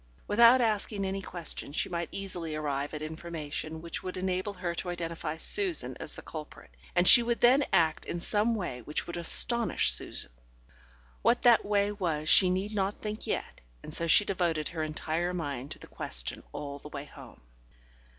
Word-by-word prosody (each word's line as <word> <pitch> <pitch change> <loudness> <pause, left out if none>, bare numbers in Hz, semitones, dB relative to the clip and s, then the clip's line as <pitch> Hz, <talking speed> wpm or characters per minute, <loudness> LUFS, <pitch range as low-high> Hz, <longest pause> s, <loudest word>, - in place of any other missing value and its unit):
Without 235 +4 +6
asking 210 -3 0
any 195 +1 -3
questions, 170 -5 -4
she - - 0
might 170 -2 -4
easily 175 -5 -5
arrive 145 -2 -3
at 155 - -5
information 160 0 -6
which 170 - -4
would 185 0 -6
enable 185 +2 -2
her 180 -2 -3
to 180 +1 -3
identify 165 -2 -4
Susan 375 - +2
as - - -5
the - - -10
culprit, 155 - -9 0.2
and 175 +1 +3
she 240 - +11
would 235 0 -1
then 255 +4 +5
act 160 -2 +2
in 170 - -4
some 215 +6 +1
way 170 - -4
which 150 +6 -3
would 170 - -6
astonish 175 - +3
Susan. - - -2 0.9
What 240 - +2
that 240 -2 +6
way 205 0 +1
was 165 -7 -2
she 185 - +7
need 190 +4 -2
not 200 0 -1
think 215 0 -4
yet, - - -4 0.2
and - - -9
so 170 - 0
she 205 +5 +5
devoted 170 -6 -1
her 165 -2 -5
entire 160 +3 -2
mind 140 -5 -4
to - - -7
the - - -11
question - - -1
all 140 - -6
the 150 - -11
way 140 -1 -7
home. 145 - -14
175 Hz, 180 wpm, -29 LUFS, 155-205 Hz, 0.9 s, she